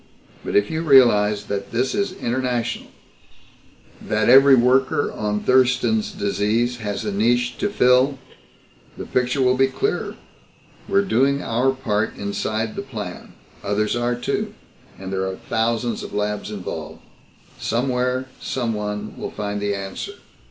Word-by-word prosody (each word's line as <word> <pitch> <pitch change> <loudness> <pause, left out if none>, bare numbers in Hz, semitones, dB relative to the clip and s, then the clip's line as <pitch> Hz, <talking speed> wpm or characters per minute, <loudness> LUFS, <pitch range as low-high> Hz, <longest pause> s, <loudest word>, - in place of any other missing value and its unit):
But - - -4
if 105 0 +3
you 160 0 -1
realize 105 -9 +5
that 100 -1 -4
this 125 +3 0
is 200 -2 -1
international, 125 -4 -2 1.1
that 110 +1 0
every 135 +2 +8
worker 130 +3 +2
on 105 -1 -2
Thurston's 130 - +2
Disease 110 - 0
has 105 -1 -4
a 105 - -1
niche 120 +4 +1
to 205 - 0
fill, 130 -5 +3 0.8
the - - -6
picture 125 +2 0
will 125 0 +3
be 135 +1 +4
clearer. 410 - -2 0.7
We're 200 0 +3
doing 140 - +2
our 125 +4 +1
part 110 -5 -1
inside 110 +2 -2
the - - -3
plan. 110 -9 -7 0.3
Others 105 +2 0
are, 120 0 0
too. 120 - -3 0.4
And 95 0 -7
there 95 0 -1
are 95 - -3
thousands 115 +3 -1
of - - -7
labs 105 0 -2
involved. 100 -4 -6 0.6
Somewhere, 125 +1 0
someone 105 -4 -3
will - - -4
find 105 -1 -4
the 100 0 0
answer. 95 -1 -6
120 Hz, 140 wpm, -22 LUFS, 105-130 Hz, 1.1 s, every